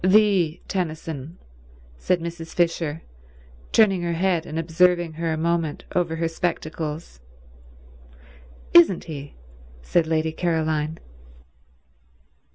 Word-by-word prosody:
"The 190 -4 +4
Tennyson," 160 -4 -4 0.6
said 175 - 0
Mrs. 165 -1 -7
Fisher, 165 -2 0 0.7
turning 195 -5 +4
her 170 0 -1
head 175 -1 0
and 155 - -5
observing 175 +1 +2
her 165 +1 -2
a 160 - -1
moment 165 -1 -1
over 170 -3 +1
her 165 0 0
spectacles. 160 - -4 1.5
"Isn't 170 +1 +7
he?" 145 -3 -8 0.5
said 165 - +1
Lady 160 0 +1
Caroline. 160 -2 -1
165 Hz, 100 wpm, -24 LUFS, 160-175 Hz, 1.5 s, Isn't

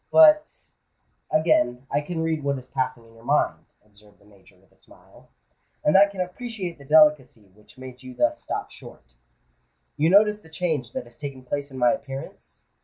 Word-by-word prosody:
"But——" 310 -1 +4 0.6
"Again 135 -6 +1
I 145 - +1
can 160 +2 -4
read 160 -2 -1
what 140 -1 -1
is 130 - -10
passing 130 -3 -3
in 115 - -20
your 115 0 -18
mind," - - 0 0.2
observed 105 0 -23
the - - -26
Major, 100 -2 -22
with - - -29
a - - -31
smile; - - -21 0.5
"and 150 - +3
I 200 +1 +7
can 200 -2 -6
appreciate 180 -2 -6
the 140 - -14
delicacy 140 -9 +3
which 105 +2 -22
made 130 -1 -11
you 130 -1 -11
thus 120 -1 0
stop - - -5
short. - - -15 0.8
You 155 +2 +3
notice 210 +2 +4
the 160 - -18
change 155 -7 -3
that - - -4
has 120 0 -18
taken 140 -3 -8
place 140 +3 -4
in 135 - -10
my 125 -1 +4
appearance? 135 -1 -8
140 Hz, 185 wpm, -24 LUFS, 120-165 Hz, 0.8 s, I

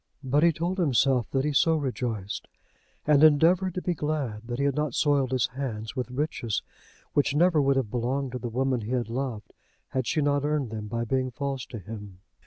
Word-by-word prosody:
But 135 +3 +2
he 170 +1 +6
told 170 +4 -2
himself 135 -5 +2
that 135 +1 0
he 150 - 0
so 160 +4 +4
rejoiced, 120 -8 -3 0.6
and 150 0 +5
endeavoured 170 +5 +5
to 180 - -3
be 180 - +1
glad 145 -8 -3
that 120 0 -3
he 140 - 0
had 140 - +2
not 150 -2 -1
soiled 140 -3 +2
his 130 -2 +2
hands 115 -4 -4
with 125 -1 -3
riches 125 -4 -2 0.5
which 145 0 +2
never 165 -1 +4
would 140 0 +3
have 130 -6 -1
belonged 130 +2 -1
to 125 - -4
the 120 - -4
woman 130 +1 0
he 110 +4 -4
had 120 -3 -1
loved 115 -4 -4 0.4
had 130 -3 -2
she 160 - +1
not 145 -1 +2
earned 145 -5 0
them 105 -1 -5
by 115 +2 -2
being 130 +2 0
false 135 0 -4
to 115 - -7
him. 105 -2 -9
135 Hz, 205 wpm, -27 LUFS, 120-150 Hz, 0.6 s, he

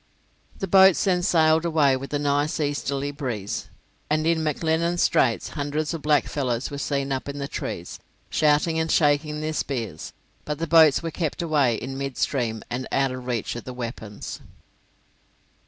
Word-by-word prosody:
The - - -2
boats 190 -2 +6
then 185 -3 +2
sailed 160 -2 +3
away 155 -5 +3
with 135 +1 -6
a 145 - 0
nice 145 +2 0
easterly 145 -1 -1
breeze, 125 -9 -4 0.4
and 155 +1 +1
in 165 0 +2
McLennan's 160 +2 0
Straits 115 -3 +2
hundreds 150 +2 -2
of 165 - -5
blackfellows 140 -4 0
were 140 - -5
seen 140 -1 -2
up 135 +1 -2
in 140 - -5
the 140 -1 -3
trees - - -5 0.3
shouting 155 +2 +2
and 160 0 0
shaking 150 0 +2
their 155 0 -2
spears; 115 - -4 0.3
but 150 -1 -3
the 165 - -2
boats 160 -2 +5
were 165 - -3
kept 165 +1 -2
away 145 -7 +2
in 135 +4 -5
mid 135 -2 -4
stream, 115 -6 -1 0.3
out 135 -1 +2
of 130 -1 -7
reach 120 -3 -2
of 120 - -6
the 125 - -7
weapons. 115 -4 -6
145 Hz, 165 wpm, -24 LUFS, 135-160 Hz, 0.4 s, boats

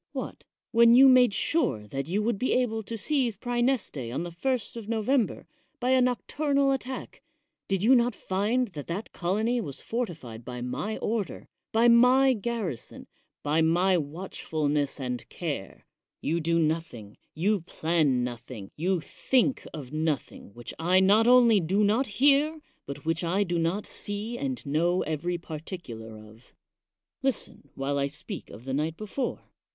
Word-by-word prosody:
What? - - -6 0.3
when 235 0 +6
you 270 +2 +9
made 255 -3 +6
sure 195 - 0
that 135 +3 -4
you 200 +5 0
would 225 -2 0
be 255 - +1
able 235 -3 +1
to 225 +2 -6
seize 250 -3 0
Praeneste 240 - -1
on 145 +7 -2
the 175 - -6
1st 240 +9 -2
of 225 -2 -7
November 230 +2 0 0.3
by 250 +1 +1
a 260 -1 +5
noc 250 -1 +1
turnal 280 -2 +2
attack, 265 -1 -5 0.5
did 195 -1 0
you 245 +5 +6
not 240 -2 +3
find 215 +6 0
that 150 -6 -8
that 185 +6 -5
colony 220 +7 0
was 140 -10 -6
fortified 160 - -5
by 125 +1 -6
my 125 - -3
order, 215 -3 -3 0.2
by 230 +2 +4
my 250 +3 +6
garrison, 210 - -4 0.4
by 150 +2 +2
my 175 +4 +3
watchfulness 150 -3 -2
and 125 -2 -4
care? 145 - -5 0.3
You 165 +3 -1
do 165 +1 +1
nothing, 155 -10 -2 0.2
you 195 +5 +1
plan 155 -6 +1
nothing, 120 -4 -7
you 180 +2 0
think 260 - 0
of 145 -4 -8
nothing 155 -8 -2
which 120 0 -7
I 180 +3 +4
not 205 +4 +5
only 240 -4 +6
do 190 +5 +1
not 225 +6 +2
hear, 290 +3 +4 0.3
but 140 +1 -7
which 165 +2 0
I 185 +4 +1
do 175 -3 -1
not 170 +5 0
see 205 +3 -4
and 260 - -3
know 170 +5 +1
every 165 +3 -2
particular 150 - -8
of. 110 +2 -16 0.7
Listen 265 - -3
while 140 +1 -1
I 140 - +1
speak 155 +7 -7
of 115 - -12
the 135 - -3
night 155 +3 -1
before. 215 +5 -3
185 Hz, 160 wpm, -27 LUFS, 150-235 Hz, 0.7 s, you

